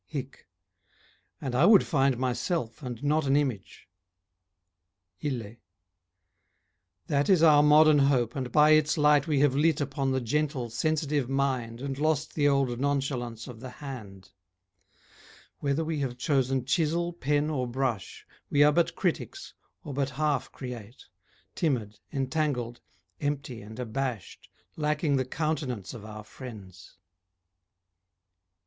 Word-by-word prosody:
HIC 135 -3 -7 0.9
And 130 -3 -4
I 140 +8 +4
would 210 -3 +7
find 135 -4 +2
myself 130 +1 -2
and 125 -1 -6
not 150 0 +1
an 135 - +3
image. 130 -9 -2 1.4
ILLE 120 -6 -4 1.5
That 145 +3 0
is 180 -4 +5
our 150 -3 +7
modern 150 0 +6
hope 130 -4 +2
and 130 -3 -3
by 150 +2 +5
its 155 +1 +4
light 150 -1 +4
We 145 -3 +2
have 145 -3 +4
lit 160 +3 +3
upon 140 -1 -1
the 130 - +1
gentle, 130 -1 -1
sensitive 145 0 0
mind 130 -4 -1
And 135 0 -4
lost 155 -1 0
the 145 -2 +2
old 135 -4 +1
nonchalance 130 -5 -2
of 120 -3 -9
the 130 +2 -8
hand; 110 -10 -9 1.3
Whether 145 +3 0
we 160 -1 -2
have 130 -3 -3
chosen 130 -1 0
chisel, 170 +4 0
pen 150 -1 0
or 130 -4 -1
brush 120 -4 -3 0.2
We 145 0 +4
are 150 - +6
but 165 +1 +1
critics, 190 - -3 0.3
or 150 -5 -6
but 135 0 -1
half 145 -3 -1
create, 120 -2 -9 0.5
Timid, 115 -10 -1
entangled, 135 -4 -2 0.4
empty 140 -5 -3
and 110 +2 -11
abashed 125 -2 -4 0.3
Lacking 150 -1 0
the 130 - 0
countenance 135 - -3
of 115 -4 -9
our 110 0 -8
friends. 105 -6 -11
135 Hz, 130 wpm, -28 LUFS, 125-150 Hz, 1.5 s, would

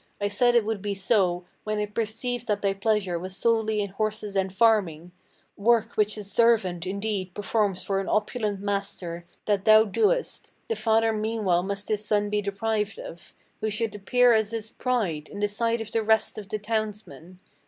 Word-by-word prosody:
I 205 0 0
said 240 +4 +3
it 235 -3 +4
would 220 -2 -2
be 205 0 -2
so 190 -3 +1 0.2
When 215 0 -2
I 210 - 0
perceived 230 +3 -3
that 205 -1 -1
thy 195 -1 +2
pleasure 195 -3 0
was 185 +2 -7
solely 220 -2 +1
in 200 - -3
horses 215 0 -3
and 190 -1 0
farming: 190 -6 +2 0.5
Work 225 +1 +3
which 210 0 +1
a 210 - -5
servant, 200 -5 +2
indeed, 200 -2 -3
performs 205 -2 0
for 195 -1 -1
an 195 - -4
opulent 210 -2 -1
master, 195 -4 -3 0.2
That 200 -2 0
thou 215 0 +8
doest; 440 - 0
the 455 - 0
father 225 - +2
meanwhile 215 -5 0
must 200 +2 -4
his 210 -1 -1
son 210 -1 +1
be 210 0 +1
deprived 210 - -2
of, - - -10 0.2
Who 215 - -1
should 215 +1 -2
appear 245 +4 +3
as 220 -2 +2
his 225 -1 -5
pride, 195 -12 -1
in 205 - -8
the 205 - +2
sight 230 +2 0
of 220 -1 -7
the 225 - +1
rest 220 0 +1
of 200 -3 -10
the 215 - -2
townsmen. 210 -6 -4
210 Hz, 185 wpm, -26 LUFS, 195-225 Hz, 0.5 s, thou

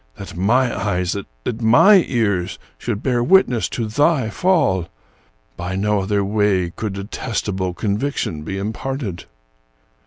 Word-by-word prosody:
That 100 - -9
my 120 +8 +2
eyes, 90 -3 -1 0.3
that 115 - -3
my 170 - +6
ears, 100 -8 0 0.2
should 115 -3 -3
bear 125 -2 +1
witness 125 - +3
to 115 - -3
thy 130 +1 +1
fall! 125 - +1 0.7
By 90 +2 -4
no 105 +1 +1
other 100 +1 0
way 100 -4 +1
could 105 +2 -4
detestable 100 -2 -3
conviction 105 - -2
be 95 +5 -5
imparted. 110 -1 -4
105 Hz, 125 wpm, -20 LUFS, 95-125 Hz, 0.7 s, my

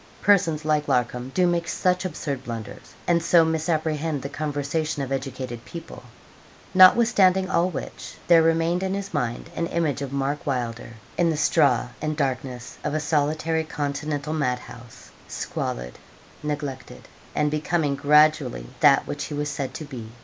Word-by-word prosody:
Persons 165 -7 +3
like 150 -1 +1
Larcom 125 +1 0
do 185 - +4
make 170 -1 +1
such 180 +1 0
absurd 140 -7 -4
blunders, 115 -3 -8
and 170 -1 +3
so 170 0 +5
misapprehend 160 -2 -1
the 140 - -4
conversation 145 0 -2
of 135 - -6
educated 130 -3 -4
people. 170 +5 -9 0.7
Nothwithstanding 190 -1 +6
all 175 +2 +2
which, - - -7
there 170 -2 +7
remained 165 +2 +2
in 190 0 -1
his 200 0 -5
mind 125 +3 -2
an 170 - -1
image 160 -5 -1
of 140 -2 -4
Mark 140 +1 -2
Wylder, 120 -4 -3 0.3
in 170 -1 +4
the 160 - 0
straw 140 -6 +3
and 155 0 -2
darkness 130 -3 -3
of 150 0 -2
a - - +1
solitary 155 +1 0
continental 150 0 -3
mad 125 -5 0
house 120 -1 -13 0.2
squalid, - - -4 0.4
neglected, 145 -4 -5 0.3
and 150 0 +1
becoming 155 -1 0
gradually 150 - +3
that - - +5
which 145 0 -4
he 150 - -5
was 150 0 -2
said 135 -2 -3
to 155 - -6
be. 125 -6 -8
150 Hz, 155 wpm, -24 LUFS, 135-165 Hz, 0.7 s, there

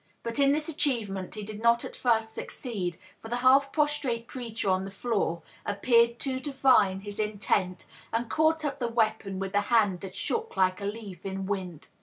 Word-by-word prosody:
But 230 +3 -3
in 275 0 +5
this 300 +1 0
achievement 235 - -1
he 210 - -5
did 210 +1 -7
not 235 0 +4
at - - -8
first 225 -2 +1
succeed; 190 - -4 0.2
for - - -8
the 240 - -1
half 275 +2 +6
prostrate 290 -6 0
creature 230 -5 -5
on 185 0 +2
the 195 - -5
floor 195 -5 -1 0.2
appeared 235 +3 +3
to 260 -2 -1
divine 260 -9 +3
his 205 +1 -7
intent, 200 -3 0 0.3
and 230 +1 -1
caught 315 +4 +2
up 285 -1 -2
the 240 - 0
weapon 220 -4 0
with 195 0 -4
a 205 - +3
hand 210 -6 +3
that 190 0 -8
shook 455 0 -3
like 185 0 +2
a - - -3
leaf 205 -4 -6
in 195 0 -4
wind. 185 -5 -4
225 Hz, 190 wpm, -28 LUFS, 195-255 Hz, 0.3 s, half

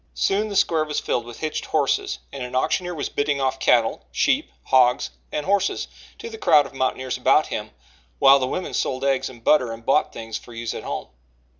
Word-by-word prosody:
Soon 205 +2 +1
the 200 - -5
square 165 -4 +3
was 150 -1 -2
filled 120 - -2
with 120 - -10
hitched 155 -1 -3
horses, 145 -4 0 0.2
and 140 - -6
an 125 0 -5
auctioneer 175 +6 0
was 145 - -3
bidding 145 -1 -1
off 135 0 -1
cattle, 115 -3 +2
sheep, 65 - +1
hogs 125 - +3 0.2
and 150 - -3
horses 200 0 0 0.3
to 460 - -8
the 450 -1 -9
crowd 150 - +5
of 135 - -11
mountaineers 130 -1 -2
about - - +4
him, - - -5 0.5
while 135 +1 +7
the 130 - -1
women 185 - -4
sold 130 0 -1
eggs 135 -1 +1
and 120 -3 -14
butter 125 -5 +3
and 115 0 -9
bought 145 +3 +2
things 115 -1 -6
for 120 - -14
use 115 0 -4
at - - -6
home. - - -5
135 Hz, 205 wpm, -23 LUFS, 125-155 Hz, 0.5 s, while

